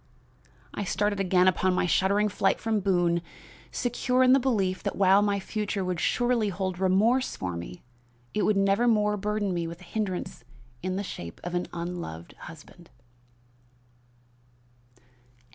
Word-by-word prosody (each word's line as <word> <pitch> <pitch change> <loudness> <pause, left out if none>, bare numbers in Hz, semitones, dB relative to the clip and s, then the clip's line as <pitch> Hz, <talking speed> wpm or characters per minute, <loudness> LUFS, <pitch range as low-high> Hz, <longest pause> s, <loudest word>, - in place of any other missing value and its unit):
I - - -3
started 205 +1 0
again 185 -1 +3
upon 185 0 +2
my 180 - +1
shuddering 200 +4 +2
flight 195 -1 +1
from 220 -1 0
Boone, 175 -3 +1 0.5
secure 250 +1 +1
in 255 0 +6
the 270 - +6
belief 205 -8 0
that - - -3
while 195 +1 +5
my 205 -1 +1
future 205 -1 -3
would 180 -2 -2
surely 240 -1 +1
hold 185 -1 -3
remorse 210 +8 +2
for 90 -2 -4
me, 85 +1 -8 0.5
it 210 - 0
would 210 -1 +2
nevermore 210 +1 +3
burden 210 -1 -1
me 170 -1 -2
with 170 +2 -8
a - - -12
hindrance 190 -1 -4 0.4
in 185 0 -2
the 200 - -2
shape 85 - -8
of 175 - -5
an 175 0 -1
unloved 170 - -6
husband." 165 +2 -13
195 Hz, 145 wpm, -27 LUFS, 180-210 Hz, 0.5 s, in